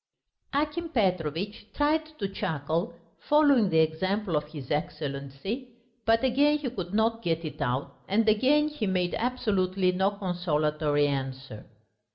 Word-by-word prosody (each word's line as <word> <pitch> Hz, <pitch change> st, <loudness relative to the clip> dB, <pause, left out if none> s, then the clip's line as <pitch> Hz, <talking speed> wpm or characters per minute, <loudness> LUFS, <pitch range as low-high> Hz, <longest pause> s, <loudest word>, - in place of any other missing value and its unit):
Akim 305 Hz, +4 st, -1 dB
Petrovitch 190 Hz, -, -1 dB
tried 310 Hz, +2 st, +2 dB
to 200 Hz, -, -2 dB
chuckle, 160 Hz, -3 st, -2 dB, 0.2 s
following 285 Hz, -8 st, +4 dB
the 160 Hz, -, +2 dB
example 185 Hz, +4 st, 0 dB
of 150 Hz, 0 st, 0 dB
his 150 Hz, -4 st, -9 dB
Excellency, 150 Hz, -, -3 dB, 0.4 s
but 225 Hz, +2 st, +3 dB
again 285 Hz, +4 st, +4 dB
he 280 Hz, -5 st, -4 dB
could 185 Hz, -7 st, -5 dB
not 225 Hz, +2 st, +1 dB
get 165 Hz, -4 st, -1 dB
it 155 Hz, -, -6 dB
out, 130 Hz, 0 st, -2 dB
and 220 Hz, +3 st, +2 dB
again 265 Hz, +8 st, +4 dB
he 295 Hz, -8 st, -3 dB
made 180 Hz, -2 st, 0 dB
absolutely 200 Hz, -6 st, +1 dB
no 190 Hz, +2 st, +2 dB
consolatory 155 Hz, -6 st, 0 dB
answer. 135 Hz, -4 st, -4 dB
190 Hz, 135 wpm, -28 LUFS, 155-235 Hz, 0.4 s, following